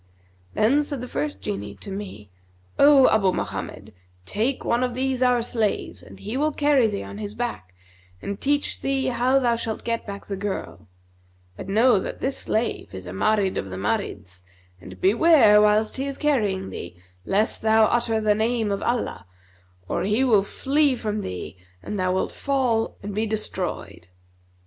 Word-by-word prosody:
Then 275 +8 +3
said 285 -2 -5
the 250 - -6
first 145 - -3
Jinni 100 +1 -5
to 200 - -8
me, 190 - -7 0.5
'O 280 -2 +7
Abu 195 -4 +3
Mohammed, 100 - -5 0.3
take 230 - -1
one 235 - +1
of 250 -1 -2
these 260 0 -1
our 250 -2 +3
slaves, 225 -3 -2
and - - -14
he 215 +4 -5
will 305 +2 +1
carry 285 -5 +3
thee 205 -2 -3
on 200 - -9
his 210 -1 -6
back 225 - -5 0.4
and 200 - -6
teach 285 +1 0
thee 270 -1 0
how 255 +2 +2
thou 240 -3 +2
shalt 225 -1 -4
get 230 -1 -2
back 200 0 -7
the 200 - -4
girl; 190 - -5 0.7
but 185 - -8
know 225 +2 +4
that - - -6
this 270 +1 -1
slave 220 - -2
is 95 0 -8
a 90 - -7
Marid 195 - +1
of 95 - -6
the 95 - -6
Marids 95 -2 -3 0.4
and 95 0 -11
beware, 220 - +6
whilst 210 +2 +2
he 270 +1 -2
is 275 - -5
carrying 210 -11 0
thee, 85 0 -8 0.3
lest 210 - 0
thou 220 0 +5
utter 235 -1 +1
the 215 -1 +3
name 220 0 0
of 200 - -2
Allah, 235 - -2 0.6
or - - -1
he 210 +6 +1
will 225 -6 +4
flee 275 +7 +1
from 215 -3 -3
thee 90 - -6 0.3
and 210 - -4
thou 185 0 +1
wilt 185 - -1
fall 255 -5 0
and 205 0 -5
be 215 +2 -1
destroyed.' 215 - -4
215 Hz, 175 wpm, -24 LUFS, 190-250 Hz, 0.7 s, O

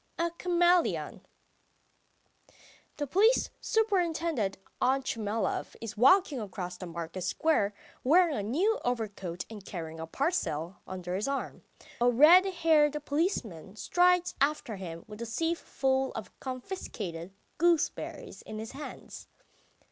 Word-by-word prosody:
A 335 0 0
CHAMELEON 350 0 +2 1.7
THE 290 - -1
police 420 - +3
superintendent 335 - 0 0.2
Otchumyelov 230 -6 0
is 225 -2 -6
walking 285 - +5
across 180 -3 -5
the 180 0 -8
market 170 +2 -6
square 210 - +1 0.3
wearing 330 +3 +4
a - - -1
new 335 - +1
overcoat 205 -7 -3
and 215 -3 -10
carrying 160 -4 -7
a 160 - -5
parcel 180 - -1
under 180 -1 -5
his 200 +6 -1
arm. 275 0 -3 0.4
A 245 - +5
red 310 +10 +7
haired 320 -5 +3
policeman 230 - -2
strides 360 +8 +3
after 280 -6 0
him 170 -3 -7
with 210 +1 -10
a 235 - -4
sieve 330 +8 -1
full 265 0 0
of 215 -4 -7
confiscated 230 - -6 0.3
gooseberries 340 -2 0
in 215 - -8
his 220 +1 -6
hands. 290 +2 -9
255 Hz, 120 wpm, -30 LUFS, -, 1.7 s, red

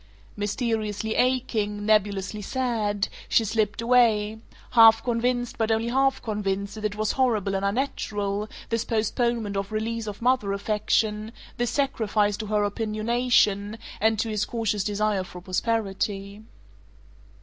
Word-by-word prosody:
Mysteriously 215 0 -2
aching, 220 -5 0
nebulously 210 -1 +1
sad, 215 -4 -1 0.2
she 225 - +3
slipped 215 0 0
away, 220 -3 +3 0.3
half 225 -1 +7
convinced 245 0 -1
but 225 -1 +1
only 225 +1 +1
half 270 +2 +1
convinced 200 -2 -2
that 215 -1 -6
it 205 -1 -1
was 215 0 0
horrible 220 -7 +1
and 195 0 -1
unnatural, 205 -2 -2 0.2
this 230 -1 0
postponement 225 -1 -1
of 195 +1 -3
release 225 +1 -2
of 205 -1 -6
mother 240 -5 +1
affection, 210 +1 0 0.3
this 240 -1 0
sacrifice 220 -6 +1
to 220 - -5
her 210 0 +1
opinionation 215 -1 +1 0.2
and 220 +1 +2
to 225 - -1
his 210 -1 0
cautious 220 -3 -1
desire 205 -1 0
for 180 0 -10
prosperity. 200 +1 -2
215 Hz, 130 wpm, -25 LUFS, 205-230 Hz, 0.3 s, half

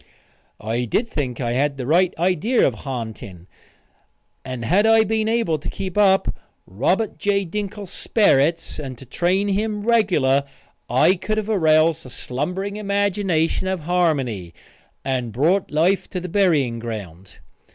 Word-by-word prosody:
I 115 +3 -2
think 145 - -2
I 120 -3 -1
had 140 +3 0
the 130 - -4
right 170 +6 +3
idea 185 +8 +2
of 130 - -1
ha'nting, 110 - -7 1.0
and 130 -3 -5
had 200 - +3
I 225 0 +6
been 220 0 0
able 225 -9 +1
to - - -6
keep 185 -2 -5
up 195 -2 +3 0.3
Robert 180 - -1
J. 200 -1 +1
Dinkle's 200 +1 -5
sperrits 165 - +1
and 135 -4 -6
to 135 - -12
train 185 +9 0
him 210 +1 -1
regular 170 - +2 0.4
I 130 +9 +4
could 205 +4 -3
have 215 0 -2
aroused 160 -3 +3
the 130 - -11
slumbering 180 +13 -4
imagination 200 -4 0
of 190 -2 -2
Harmony, 140 - -1 0.5
and 125 -3 -2
brought 165 - +1
life 170 +6 +1
to 185 - -4
the 180 +1 -6
burying 155 - +2
ground. 100 -6 -8
165 Hz, 140 wpm, -21 LUFS, 130-200 Hz, 1.0 s, I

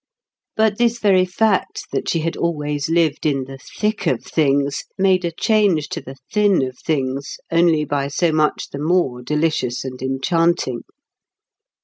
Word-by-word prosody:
But 220 -1 +2
this 235 -1 +2
very 195 -5 +3
fact 195 +2 0
that - - -2
she 165 - 0
had 165 +1 -2
always 150 -2 -2
lived 165 -3 +1
in 140 -3 +1
the 135 +1 -10
Thick 210 +4 -3
of - - 0
Things 140 -2 +1
made 190 -1 +3
a 170 - -1
change 190 -4 +2
to - - -4
the 135 - -10 0.2
Thin 205 -7 +3
of 130 -1 -4
Things 135 -3 -2
only 165 -2 +3
by 140 -1 -1
so 165 +4 +1
much 155 -1 0
the 140 - -6
more 150 -6 +1
delicious 150 -3 -1
and 130 -1 -7
enchanting. 135 0 0
160 Hz, 155 wpm, -20 LUFS, 140-185 Hz, 0.2 s, very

